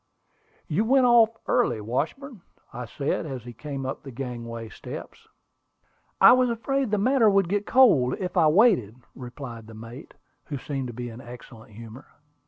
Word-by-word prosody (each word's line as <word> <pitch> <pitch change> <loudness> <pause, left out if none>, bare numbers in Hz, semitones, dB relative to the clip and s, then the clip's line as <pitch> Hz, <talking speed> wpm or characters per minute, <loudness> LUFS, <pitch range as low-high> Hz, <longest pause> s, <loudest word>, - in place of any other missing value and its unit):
"You 175 +8 0
went 260 +3 +3
off 235 -2 +6 0.2
early, 240 - +1
Washburn," 170 - -4 0.3
I 125 0 -6
said, 140 +6 -3
as 130 -5 -6
he 120 0 -10
came 140 +2 -6
up 135 - -5
the 140 - -10
gangway 115 -3 -6
steps. - - -10 0.9
"I - - +9
was 255 0 +4
afraid 265 +3 -1
the 210 - +1
matter 235 +1 +3
would 195 -3 +2
get 205 +3 -2
cold 155 - +4
if 185 0 -5
I 165 -4 +4
waited," 165 - +3 0.2
replied 120 -3 -9
the 110 - -12
mate, 115 +6 -11 0.3
who 145 - -5
seemed 135 0 -5
to - - -6
be 120 +1 -6
in 115 +2 -10
excellent 120 -3 -13
humor. 115 +4 -12
140 Hz, 170 wpm, -25 LUFS, -, 0.9 s, I